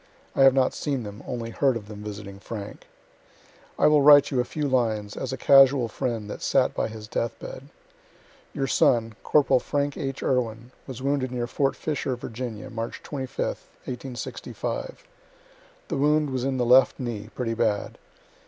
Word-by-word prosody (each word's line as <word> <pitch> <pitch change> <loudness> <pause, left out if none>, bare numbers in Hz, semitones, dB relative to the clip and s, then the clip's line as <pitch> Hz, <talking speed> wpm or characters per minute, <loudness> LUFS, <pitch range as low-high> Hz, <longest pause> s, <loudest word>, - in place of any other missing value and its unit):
(I - - +2
have 135 -1 +7
not 130 -1 +3
seen 140 -5 -2
them, 105 0 -8
only 115 -2 -4
heard 130 0 +2
of 105 -3 -10
them 105 -1 -9
visiting 100 -2 -8
Frank.) 105 -1 -8 0.9
I - - +3
will 150 -1 +6
write 145 0 +7
you 130 - +1
a - - +3
few 150 +4 -3
lines 110 -6 0
as 130 - -4
a 130 - -3
casual 135 -1 +6
friend 115 -1 -3
that - - -7
sat - - +2
by - - -1
his 110 -1 -9
death 115 +1 -2
bed. 135 +2 -9 0.8
Your 135 - -2
son, 115 -3 +2
corporal 145 -3 +4
Frank 145 +2 -2
H. 135 0 -4
Irwin, 120 -2 -1 0.2
was 130 -1 -7
wounded 140 -2 0
near 120 -1 -2
fort 135 +3 0
Fisher, 140 -4 -2
Virginia, 120 -2 -6
March 115 +1 -5
25th, 135 -3 -4 0.2
1865 130 - -6 0.8
the 160 - -1
wound 150 +1 +2
was 130 -1 -2
in 135 -1 -1
the 125 - +1
left 125 +2 +5
knee, 115 -4 -5
pretty 115 -3 -2
bad. 110 -3 -1
125 Hz, 170 wpm, -25 LUFS, 115-135 Hz, 0.9 s, have